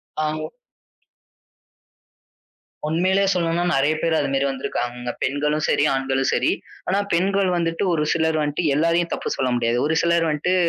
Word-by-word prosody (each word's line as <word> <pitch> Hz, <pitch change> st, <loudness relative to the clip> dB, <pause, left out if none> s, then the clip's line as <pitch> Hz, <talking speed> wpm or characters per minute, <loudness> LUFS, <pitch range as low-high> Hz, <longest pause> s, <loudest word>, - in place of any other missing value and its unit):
அ 155 Hz, 0 st, -1 dB, 2.5 s
உண்மையிலேயே 185 Hz, +5 st, +2 dB
சொல்லணும்னா 170 Hz, 0 st, 0 dB
நிறைய 145 Hz, +3 st, +2 dB
பேர் 165 Hz, -1 st, +1 dB
அது -, -, -1 dB
மாதிரி 135 Hz, 0 st, +1 dB
வந்திருக்காங்க. 125 Hz, -2 st, -4 dB
பெண்களும் 150 Hz, +3 st, 0 dB
சரி, -, -, +2 dB
ஆண்களும் 135 Hz, 0 st, 0 dB
சரி. -, -, +2 dB, 0.4 s
ஆனா 190 Hz, -, +1 dB, 0.2 s
பெண்கள் 195 Hz, +2 st, +2 dB
வந்துட்டு 165 Hz, +1 st, -1 dB
ஒரு 150 Hz, -2 st, +1 dB
சிலர் 160 Hz, -1 st, +1 dB
வந்துட்டு 150 Hz, +3 st, -1 dB
எல்லாரையும் 170 Hz, +2 st, +1 dB
தப்பு -, -, -3 dB
சொல்ல 130 Hz, -1 st, 0 dB
முடியாது. 120 Hz, 0 st, 0 dB
ஒரு 160 Hz, -, 0 dB
சிலர் 170 Hz, -1 st, +2 dB
வந்துட்டு 155 Hz, +5 st, 0 dB
155 Hz, 140 wpm, -22 LUFS, 135-170 Hz, 2.5 s, உண்மையிலேயே